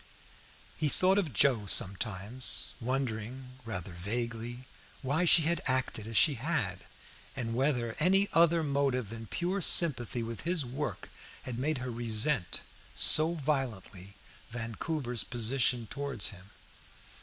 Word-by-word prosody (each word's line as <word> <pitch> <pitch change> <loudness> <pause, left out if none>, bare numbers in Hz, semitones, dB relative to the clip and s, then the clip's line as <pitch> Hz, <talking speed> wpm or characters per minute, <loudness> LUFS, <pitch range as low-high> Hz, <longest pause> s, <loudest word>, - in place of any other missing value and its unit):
He 155 -2 0
thought 190 +6 +2
of 170 -8 -2
Joe 115 -1 +2
sometimes, 100 +6 0
wondering 125 0 -4
rather 95 -5 -5
vaguely 115 +6 -4 0.4
why 145 +7 +1
she 165 -1 +7
had 170 +2 0
acted 130 -4 -1
as 115 - -1
she 150 - +6
had, 130 - -2 0.5
and 115 -3 -4
whether 120 -3 0
any 195 +5 +4
other 170 0 +4
motive 140 -6 0
than 115 -1 -8
pure 185 - -2
sympathy 125 - +4
with 115 0 -6
his 170 -4 0
work 135 +5 -5 0.3
had 120 -1 -5
made 150 +3 0
her 125 0 -5
resent 115 - 0 0.3
so 160 +2 +6
violently 115 - -4 0.3
Vancouver's 120 +2 -3
position 120 0 +1
towards 140 -2 -2
him. 95 -1 -12
125 Hz, 125 wpm, -30 LUFS, 115-150 Hz, 0.5 s, she